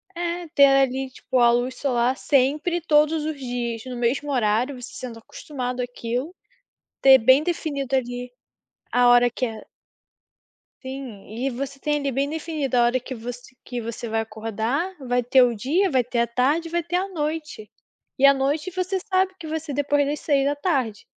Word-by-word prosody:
É. 345 0 -3
Ter 280 - +8
ali, 270 -1 +2
tipo, 255 - -3
a 235 0 +6
luz 245 +2 0
solar 250 -1 0
sempre, 300 +6 +1
todos 305 0 +3
os 310 -2 -3
dias, 240 -3 -3
no 255 -1 -6
mesmo 250 +5 -1
horário, 245 +2 0
você 255 - -9
sendo 235 -3 -7
acostumado 250 0 -5
àquilo, 245 +6 -4 0.7
ter 265 -1 +8
bem 260 +5 +5
definido 285 -6 -2
ali, 245 -1 -3 0.6
a 245 0 +4
hora 245 0 +6
que 255 - -2
é 220 -1 -8 1.2
Sim, 260 -6 -8
e 240 +6 -3
você 275 +2 -5
tem 295 +2 0
ali 280 -1 -1
bem 275 +2 -1
definido 305 -5 -2
a 240 - +5
hora 245 +1 +1
que 260 +1 -7
você 245 +2 -8
que 245 -2 -4
você 230 +1 -6
vai 225 0 0
acordar, 225 - -3
vai 245 0 +1
ter 255 +2 +4
o 240 -1 +2
dia, 320 - +1
vai 255 -3 +2
ter 245 -1 -2
a 235 - +2
tarde 285 +8 +1
e - - -16
vai 345 0 +1
ter 345 +2 -4
a 370 +2 +1
noite. 305 - -4 0.5
E 275 - +4
à 275 - +8
noite 290 +6 -1
você 370 +1 -1
sabe 375 0 +2
que 335 - -10
vai 320 +1 -2
ser 300 -2 -7
depois 290 0 +1
das 295 +1 -3
18h. 280 - 0
265 Hz, 185 wpm, -23 LUFS, 245-300 Hz, 1.2 s, Ter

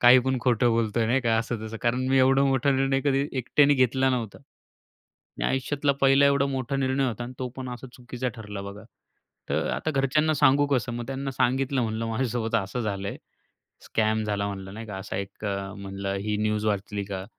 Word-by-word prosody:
काही 125 +1 +8
पण 130 -1 +1
खोटं 120 -1 +3
बोलतोय 115 0 +1
नाही 125 +4 +2
का, 115 -3 +2
असं 115 -1 -3
तसं. 110 +1 -6
कारण 125 +2 +1
मी 135 0 +4
एवढा 135 +1 +5
मोठा 135 0 +2
निर्णय 135 0 +2
कधी 140 0 +2
एकट्याने 145 +3 +4
घेतला 130 0 +2
नव्हता. 115 -5 -3
आणि - - -15
आयुष्यातला 140 +2 0
पहिला 135 +1 +5
एवढा 140 0 +3
मोठा 135 0 -2
निर्णय 135 0 +1
होता 120 0 -4
आणि 125 - -7
तो 130 - -3
पण 130 -1 -5
असा 125 +1 -7
चुकीचा 125 0 -5
ठरला 105 -3 -7
बघा. 100 +2 -9 0.6
तर - - 0
आता 155 - -2
घरच्यांना 150 +2 +2
सांगू 145 0 +4
कसं? 130 -4 0
मग 120 0 -5
त्यांना 135 +1 -3
सांगितलं, 130 +1 +1
म्हणलं 110 0 -2
माझ्यासोबत 115 -1 -1
असं 100 +3 -2
झालंय. 100 -3 -3 0.7
स्कॅम 110 0 0
झाला 100 -1 -1
म्हणलं 95 -1 -7
नाही 115 +1 -7
का. 105 -3 -6
असा 95 0 -6
एक 100 +2 -6
अ, 100 -1 -3
म्हणलं 100 0 -4
ही 105 -1 0
न्यूज 105 0 0
वाचली 100 0 -1
का? 95 -1 -5
120 Hz, 195 wpm, -26 LUFS, 105-135 Hz, 0.7 s, काही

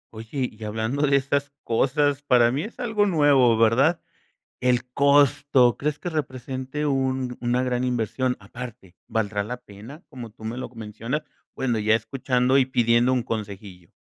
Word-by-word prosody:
Oye, 120 +4 -3
y 110 - -12
hablando 110 +7 -1
de 140 - +3
estas 140 +1 0
cosas, 140 +4 +1
para 125 -4 +4
mí 135 +4 -1
es 220 +7 -8
algo 220 -4 +1
nuevo, 145 - +4
¿verdad?, 125 +9 +3 0.6
el 125 -1 +1
costo, 140 -2 +4
¿crees 150 0 -2
que 175 - -5
represente 130 -1 -4
un 130 -3 -1
una 125 +1 +1
gran 125 -1 -1
inversión?, 125 +1 -1
aparte, 110 -2 -10
¿valdrá 105 -2 -1
la 125 +4 -5
pena?, 120 - -13
como 125 -5 -9
tú 110 +1 -17
me 115 +2 -4
lo 130 - -5
mencionas, 115 +5 -5 0.3
bueno, 120 -4 -1
ya 110 +1 +3
escuchando 125 +3 +1
y 130 - +2
pidiendo 120 -1 +3
un 125 -2 +1
consejillo. 100 -5 -6
125 Hz, 160 wpm, -24 LUFS, 115-140 Hz, 0.6 s, para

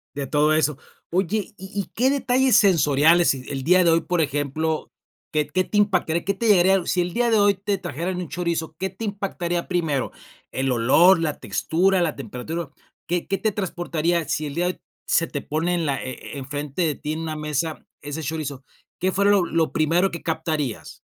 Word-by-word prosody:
De 140 -1 -3
todo 150 +3 +2
eso. 155 -2 +1 0.3
Oye, 195 +4 -1
¿y 190 +1 -10
y - - -6
qué 255 +4 +3
detalles 260 -3 +3
sensoriales 165 -3 +5
el 135 +1 -6
día 180 +4 +4
de 170 - +5
hoy, 165 0 +4
por 175 0 0
ejemplo 150 +2 -1 0.4
qué 150 -1 +1
qué 185 - 0
te 210 - -2
impactaría 185 -5 +1
qué 200 - 0
te 230 +3 -1
llegaría 190 -2 +5
sí 180 - +1
el 175 0 -3
día 240 0 +2
de 220 - +4
hoy 205 0 +4
te 200 +1 -2
trajeran 175 +2 -4
un 180 -2 -4
chorizo, 170 -2 -2
qué 190 +1 -2
te 195 +5 -8
impactaría 190 -4 -3
primero, 160 -7 0 0.4
el 135 0 -1
olor, 145 +10 +5
la 155 -3 -1
textura, 185 +3 +1
la 160 -3 -1
temperatura, 140 +4 -5 0.4
qué 175 0 -1
qué 195 - 0
te 215 - 0
transportaría 175 -4 -1
sí 155 - -1
el 140 - -6
día 175 - +1
de 180 - +1
hoy - - -30 0.3
se 165 - +2
te 145 - -4
pone 165 +4 -1
en 170 -3 -1
la 140 -1 -1
e - - -4 0.2
e - - -6
enfrente 145 +4 -4
de 155 -4 0
ti 150 - -4
en 160 - -4
una 160 -1 -4
mesa 150 +1 -3 0.2
ese 145 +2 -5
chorizo? 145 -3 -4 0.4
¿Qué 185 0 +1
fue 200 +2 +1
lo 200 -3 +4
lo 165 -1 0
primero 170 +5 +2
que 170 - -7
captarías? 160 -6 -3
170 Hz, 205 wpm, -23 LUFS, 150-190 Hz, 0.4 s, sensoriales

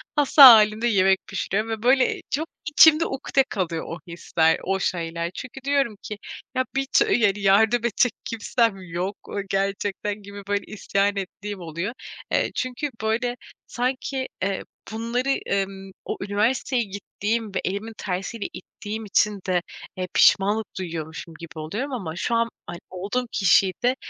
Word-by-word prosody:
hasta 290 0 +6
hâlimde 220 -1 +8
yemek 190 -3 +4
pişiriyorum 200 +3 -2
ve, 220 -1 -4
böyle, 255 +1 +3
çok, 315 +4 -1 0.2
içimde 315 +1 +7
ukde 270 -1 +1
kalıyor 170 -4 -2
o 165 - -6
hisler, 165 -1 +1
o 190 +1 0
şeyler. 170 -2 -2
Çünkü 255 +1 -7
diyorum 275 -6 +1
ki, 210 - -6 0.4
"Ya, 255 0 +1
bir 270 0 +1
ç - - +5
yani 210 -4 +3
yardım 205 +4 +4
edecek 235 +1 +2
kimsem 230 -1 0
yok, 180 +3 -4
o - - -6
gerçekten." 200 +1 -2
gibi, 200 0 -9
böyle, 205 0 0
isyan 200 -1 0
ettiğim 200 +1 -5
oluyor. 170 +6 -4 0.4
Eee, - - +1
çünkü, 255 +3 -2
böyle, 240 +3 0 0.3
sanki, 260 +1 -2 0.2
eee, 195 0 -1 0.3
bunları, 235 +4 -2 0.2
emm, 195 -1 -2
o - - -3
üniversiteye 230 +5 0
gittiğim 205 +1 -4
ve - - 0
elimin 200 +4 -3
tersiyle 195 +4 -4
ittiğim 215 +3 -7
için 210 0 +2
de, 180 -1 +2 0.4
eee, 185 - -2
pişmanlık 205 +2 +4
duyuyormuşum 165 -2 -6
gibi 165 -1 -9
oluyorum 215 - -4
ama 180 -10 -4
şu 230 +6 -1
an, 230 0 +2 0.2
hani, 175 0 -7
olduğum 200 +7 -3
kişiyi 195 -1 +4
de, 250 +1 +3
205 Hz, 150 wpm, -24 LUFS, 190-240 Hz, 0.4 s, hâlimde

